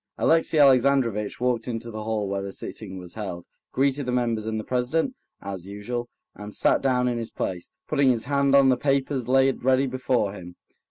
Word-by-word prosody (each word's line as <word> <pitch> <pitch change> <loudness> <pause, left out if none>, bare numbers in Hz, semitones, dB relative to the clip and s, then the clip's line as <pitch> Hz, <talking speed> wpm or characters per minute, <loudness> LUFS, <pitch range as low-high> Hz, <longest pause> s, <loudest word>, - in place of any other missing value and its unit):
Alexey 165 0 +2
Alexandrovitch 130 -6 +3
walked 125 -2 0
into 115 -1 -4
the 110 0 -6
hall 110 -2 -1
where 100 0 -2
the 100 0 -5
sitting 95 -1 -7
was 90 -1 -9
held, 95 -5 -6 0.3
greeted 135 0 0
the - - 0
members 115 -3 0
and 110 0 -2
the - - -5
president, 130 - 0 0.3
as 95 -2 -6
usual, 120 +4 -5 0.2
and 105 0 -9
sat - - +2
down 125 -2 +2
in 120 -1 -1
his 115 - -4
place, 90 -2 -4 0.2
putting 140 -1 +3
his 120 -3 +1
hand 140 0 +2
on 135 -1 +6
the 130 - +3
papers 135 -3 0
laid 135 0 +2
ready 130 +1 +3
before 125 -5 0
him. 90 -3 -10
120 Hz, 195 wpm, -25 LUFS, 105-135 Hz, 0.3 s, on